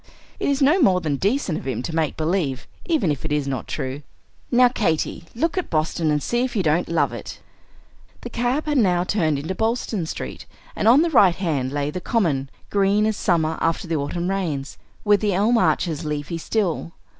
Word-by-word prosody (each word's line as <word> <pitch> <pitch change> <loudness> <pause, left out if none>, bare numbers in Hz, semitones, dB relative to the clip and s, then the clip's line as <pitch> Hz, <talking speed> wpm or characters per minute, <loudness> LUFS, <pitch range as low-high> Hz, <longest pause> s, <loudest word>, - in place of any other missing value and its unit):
It - - 0
is 280 0 +2
no 305 +8 +4
more 190 -8 +4
than 155 -5 -1
decent 200 - 0
of - - -9
him 125 -2 -2
to 160 - -4
make 160 -2 0
believe, 155 -5 -1 0.2
even 300 - +1
if 140 - -4
it 160 - -4
is 150 -2 0
not 130 -3 -3
true. 130 +2 -4 0.5
Now, 250 0 +6
Katy, 170 -8 -1
look 330 +9 0
at 365 - -5
Boston, 155 0 0
and 150 -1 +1
see 240 +1 0
if 255 -1 -3
you 195 - +1
don't 160 +2 +1
love 170 - +1
it!" - - -8 0.8
The 240 - -7
cab 245 +6 0
had 295 -3 +1
now 180 -5 +3
turned 160 -6 +1
into 155 +6 -3
Boylston 220 -4 -1
Street; - - -6 0.3
and - - 0
on 260 +7 +7
the 340 - 0
right 195 - +5
hand 145 -9 -1
lay 145 0 -1
the 180 - -5
Common, 155 - 0 0.2
green 200 +1 +3
as 220 0 +1
summer 160 -5 0
after 165 +2 0
the 165 -1 0
autumn 170 +6 -2
rains, 155 -8 -3 0.2
with 205 -2 +4
the 205 -3 +1
elm 215 +5 +3
arches 160 -3 +1
leafy 150 +2 -3
still. 175 -3 -1
175 Hz, 200 wpm, -22 LUFS, 155-220 Hz, 0.8 s, on